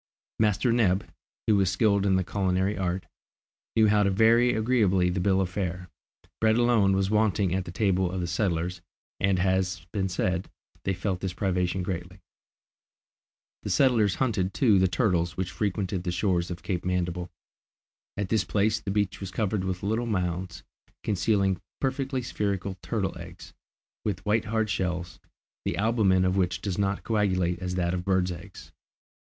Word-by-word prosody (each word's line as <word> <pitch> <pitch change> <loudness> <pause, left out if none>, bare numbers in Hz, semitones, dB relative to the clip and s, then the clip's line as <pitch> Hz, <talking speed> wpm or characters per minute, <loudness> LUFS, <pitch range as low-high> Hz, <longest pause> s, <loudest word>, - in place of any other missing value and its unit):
Master 110 +3 +2
Neb, 100 -5 +2 0.4
who 110 - +4
was 95 -2 +3
skilled 100 +1 +2
in 95 - +3
the 95 - +2
culinary 95 +1 0
art, 90 0 -2 0.7
knew 110 -1 +5
how 105 0 +4
to 100 - +3
vary 115 +5 +4
agreeably 105 -6 +2
the 90 - -1
bill 95 +1 +2
of 95 - +1
fare. 90 -2 -3 0.5
Bread 110 0 +3
alone 115 -5 +3
was 95 +1 0
wanting 105 -4 +2
at 95 -1 -1
the 85 - -7
table 95 -1 +1
of 95 - -3
the 90 - -1
settlers, 85 -1 -1 0.4
and 95 -1 +2
as 90 - +1 0.3
has 85 - -18
been 95 -2 0
said, 90 0 -1 0.4
they 95 - 0
felt 95 0 -2
this 95 -2 -3
privation 90 -1 0
greatly. 90 0 -5 1.4
The - - -5
settlers 115 -8 +3
hunted 100 -7 0
too 110 -8 +4
the 95 - +4
turtles 85 -2 0
which 90 0 -2
frequented 95 -3 -2
the 90 - -1
shores 90 -1 0
of 90 -1 -6
Cape 90 -3 -2
Mandible. 90 -1 -2 0.9
At 100 -2 -2
this 110 0 +2
place 110 +1 +1
the 100 - -6
beach 100 0 0
was 95 - -5
covered 100 0 -1
with 95 -1 -3
little 110 +4 0
mounds, 90 -3 -2 0.4
concealing 100 -2 +1 0.2
perfectly 135 -1 -1
spherical 100 -4 -2
turtles' 95 -5 -2
eggs, 85 +1 -11 0.5
with 100 -2 -3
white 105 +1 +2
hard 110 0 0
shells, 90 -3 -3 0.4
the - - -2
albumen 100 -4 +3
of 95 +1 +1
which 90 -2 +1
does 100 -2 -3
not 100 0 0
coagulate 95 -5 +1
as 90 -1 -3
that 85 -1 0
of 90 -1 -2
birds' 95 -1 +1
eggs. 90 +3 -10
95 Hz, 170 wpm, -27 LUFS, 90-105 Hz, 1.4 s, knew